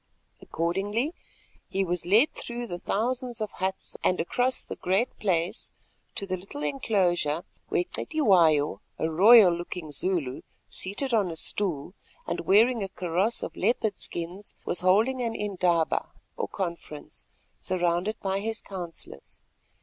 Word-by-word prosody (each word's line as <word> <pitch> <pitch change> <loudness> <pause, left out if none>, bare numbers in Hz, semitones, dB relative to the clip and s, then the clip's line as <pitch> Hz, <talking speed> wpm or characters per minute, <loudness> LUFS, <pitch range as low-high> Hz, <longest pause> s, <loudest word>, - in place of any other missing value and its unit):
Accordingly 205 - -1 0.6
he 195 0 0
was 175 -1 -2
led 220 +10 +5
through 240 0 -5
the 175 -6 -5
thousands 245 +5 -2
of 215 -1 -3
huts 190 +1 -3
and 185 - +2
across 250 +8 0
the - - -7
Great 195 +7 +1
Place 185 0 -1 0.4
to 200 - -3
the 185 -1 -2
little 180 -5 -7
enclosure 170 +1 +1 0.3
where 175 - +2
Cetywayo, 175 - +3 0.2
a 160 - -1
royal 200 +2 +8
looking 170 -2 -5
Zulu 145 -4 0 0.3
seated 235 +8 -3
on 205 -5 +3
a 165 - -5
stool, 175 -2 -1 0.3
and - - -2
wearing 230 +4 +5
a 195 - -2
kaross 185 +5 0
of - - -5
leopard 220 0 +1
skins, 175 +4 -5
was - - +1
holding 220 +8 +3
an 230 -2 -1
indaba, 180 -5 +1 0.3
or - - -2
conference, 170 -5 -5 0.3
surrounded 180 +3 0
by 195 0 0
his 225 +2 -2
counsellors. 170 - -8
190 Hz, 135 wpm, -27 LUFS, 170-220 Hz, 0.6 s, royal